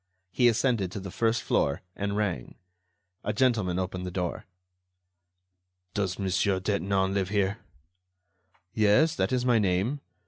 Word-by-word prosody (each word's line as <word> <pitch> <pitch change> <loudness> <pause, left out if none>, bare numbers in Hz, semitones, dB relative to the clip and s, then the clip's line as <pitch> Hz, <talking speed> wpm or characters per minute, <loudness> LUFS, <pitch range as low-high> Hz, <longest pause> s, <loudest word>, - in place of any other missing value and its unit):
He 125 - +4
ascended 115 -5 +1
to - - -4
the 95 -1 -7
first 115 +2 +1
floor 70 - 0
and 100 0 -2
rang. 95 -12 -2 0.7
A 105 - -1
gentleman 115 -9 +1
opened 95 0 -3
the 90 - -3
door. 90 -1 -3 1.5
"Does 95 -3 -1
Monsieur 95 0 +1
Detinan 95 0 0
live 95 -2 0
here?" 100 0 0 1.1
"Yes, 110 +9 +4
that 95 0 0
is 125 -1 0
my 120 -2 +4
name. 100 +8 0
100 Hz, 135 wpm, -28 LUFS, 95-115 Hz, 1.5 s, He